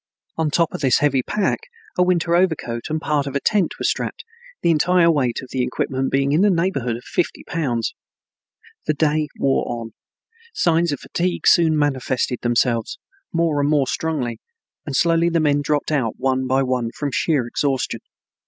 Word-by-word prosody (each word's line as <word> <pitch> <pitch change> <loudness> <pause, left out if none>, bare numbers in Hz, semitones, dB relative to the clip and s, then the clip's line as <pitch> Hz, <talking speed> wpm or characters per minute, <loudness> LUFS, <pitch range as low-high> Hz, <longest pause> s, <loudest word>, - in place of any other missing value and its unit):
On 160 -1 0
top 165 +2 +1
of - - -5
this 130 -4 +4
heavy 140 -3 +2
pack 200 +9 -1 0.4
a - - +1
winter 175 -2 +2
overcoat 160 -10 0
and 155 +1 -1
part 150 -2 0
of 140 - -5
a - - +2
tent 200 +2 +1
were - - -6
strapped, - - -2 0.4
the 170 - +4
entire 170 +2 +4
weight 130 -5 0
of 130 - -11
the 130 - -1
equipment 130 +1 -1
being 135 0 +1
in 155 +5 +3
the 205 - +5
neighborhood 165 - 0
of 120 - -13
fifty 175 - -2
pounds. 125 -9 -2 0.9
The 155 - +1
day 155 0 +1
wore 135 -1 +1
on. 115 -1 -5 0.6
Signs 170 - +2
of 145 - -4
fatigue 180 +1 -2
soon 160 -2 +5
manifested 130 -4 0
themselves 120 -1 0 0.3
more 165 -4 +1
and 145 - +1
more 145 -3 +3
strongly, 135 -5 -2 0.5
and 140 - -3
slowly 170 +1 +3
the 165 -1 +1
men 145 -2 +2
dropped 145 +1 -1
out 130 -7 0
one 130 -1 0
by 135 +1 +2
one, 125 -3 -1
from 145 -2 -2
sheer 145 -3 +1
exhaustion. 135 +2 -1
145 Hz, 180 wpm, -21 LUFS, 130-165 Hz, 0.9 s, the